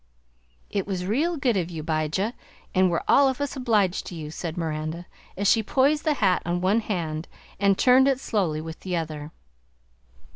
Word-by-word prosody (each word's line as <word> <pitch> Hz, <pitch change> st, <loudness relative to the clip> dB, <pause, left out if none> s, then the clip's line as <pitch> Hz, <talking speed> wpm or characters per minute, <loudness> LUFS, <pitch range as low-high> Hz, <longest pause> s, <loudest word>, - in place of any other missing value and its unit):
"It 200 Hz, -2 st, -2 dB
was 185 Hz, -2 st, -3 dB
real 305 Hz, -, 0 dB
good 255 Hz, -5 st, +1 dB
of 180 Hz, -3 st, -1 dB
you, 160 Hz, -3 st, -6 dB
'Bijah, 160 Hz, +8 st, -1 dB, 0.4 s
an' 185 Hz, -1 st, +4 dB
we're 170 Hz, -, -1 dB
all 275 Hz, -1 st, +6 dB
of 265 Hz, -, -3 dB
us 285 Hz, 0 st, -2 dB
obliged 215 Hz, -8 st, +1 dB
to 175 Hz, -, -7 dB
you," 155 Hz, -2 st, -6 dB
said 165 Hz, +1 st, -5 dB
Miranda, 160 Hz, +1 st, -3 dB, 0.3 s
as 200 Hz, +1 st, 0 dB
she 225 Hz, -, +5 dB
poised 275 Hz, +7 st, +2 dB
the 305 Hz, -2 st, +2 dB
hat 195 Hz, -7 st, +2 dB
on 175 Hz, 0 st, -1 dB
one 190 Hz, +5 st, +2 dB
hand 165 Hz, -7 st, -3 dB, 0.3 s
and 200 Hz, -1 st, +3 dB
turned 260 Hz, +1 st, +5 dB
it 270 Hz, -2 st, +2 dB
slowly 180 Hz, -, -1 dB
with 160 Hz, 0 st, -8 dB
the 185 Hz, -2 st, -3 dB
other. 155 Hz, -2 st, -5 dB
185 Hz, 185 wpm, -25 LUFS, 165-240 Hz, 0.4 s, all